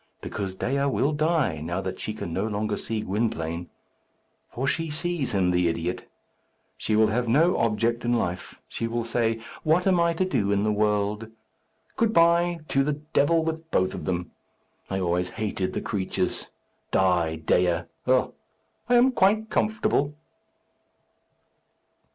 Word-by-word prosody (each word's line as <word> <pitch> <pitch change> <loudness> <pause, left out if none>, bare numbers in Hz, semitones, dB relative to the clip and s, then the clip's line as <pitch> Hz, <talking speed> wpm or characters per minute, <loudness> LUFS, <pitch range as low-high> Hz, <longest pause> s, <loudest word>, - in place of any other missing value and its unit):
Because 95 -2 -5
Dea 140 +7 0
will 140 +1 +1
die, 155 - +1
now 85 +3 -2
that 95 -1 -5
she 110 - -4
can 85 -6 -5
no 100 +5 -1
longer 105 0 -1
see 110 -1 -3
Gwynplaine. 90 -6 -2 0.8
For 130 - -3
she 160 +4 -1
sees 155 -3 -2
him, 90 -2 +2
the 90 -1 +2
idiot! 85 +2 -3 0.7
She 110 - -1
will 110 0 +4
have 120 +2 0
no 160 +10 +4
object 115 +1 +1
in 120 0 +1
life. 90 -7 -2
She 115 - -3
will 120 +1 -2
say, 115 -1 0 0.2
'What 160 +3 +2
am 185 -2 +3
I 170 0 +3
to 185 +3 0
do 105 - 0
in 100 0 +2
the 105 - +2
world?' 105 +1 0 0.7
Good 230 -1 +2
bye! 170 0 +4
To 135 - +3
the 150 +2 0
devil 150 +2 +1
with 160 0 -4
both 95 -8 +1
of - - -6
them. 90 -1 -2 0.6
I 95 - -1
always 90 0 0
hated 100 -4 -3
the - - -2
creatures! 95 -4 -2 0.4
Die, 90 -4 +2
Dea! 85 +2 +2 0.3
Oh, 130 0 +3 0.6
I 245 - +5
am 250 +2 +6
quite 215 0 +2
comfortable!" 150 -9 +1
115 Hz, 155 wpm, -26 LUFS, 95-155 Hz, 0.8 s, am